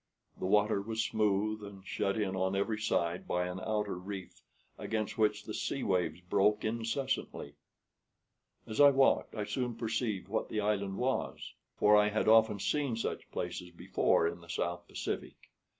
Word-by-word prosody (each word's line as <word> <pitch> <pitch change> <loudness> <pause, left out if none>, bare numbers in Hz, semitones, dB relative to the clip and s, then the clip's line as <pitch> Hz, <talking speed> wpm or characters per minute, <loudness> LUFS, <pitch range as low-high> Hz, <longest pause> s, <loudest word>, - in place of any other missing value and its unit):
The - - -2
water 105 +1 +3
was 110 +2 -2
smooth, 105 0 0
and 100 -2 -10
shut 100 +2 -1
in 95 -3 -1
on 95 +1 0
every 105 +2 0
side 90 -5 0
by 90 0 0
an 90 +1 -4
outer 105 -1 -1
reef 95 0 -8 0.3
against 110 -2 -3
which 105 -1 +1
the 110 - -6
sea 140 - -2
waves 90 -3 0
broke 105 +4 +2
incessantly. 115 - -2 1.1
As 110 +6 0
I 145 - +10
walked 135 -1 +3
I 105 - -2
soon 125 +2 -2
perceived 110 -4 -2
what 110 +3 -2
the 110 - -1
island 100 -2 0
was; 130 +2 -2 0.2
for 105 0 +5
I 105 0 +5
had 110 +1 0
often 110 -1 +6
seen 140 +3 0
such 115 - -4
places 90 - -4
before 85 -1 +1
in 85 - -5
the 85 - -16
South 85 0 -2
Pacific. - - -5
105 Hz, 165 wpm, -32 LUFS, 95-110 Hz, 1.1 s, I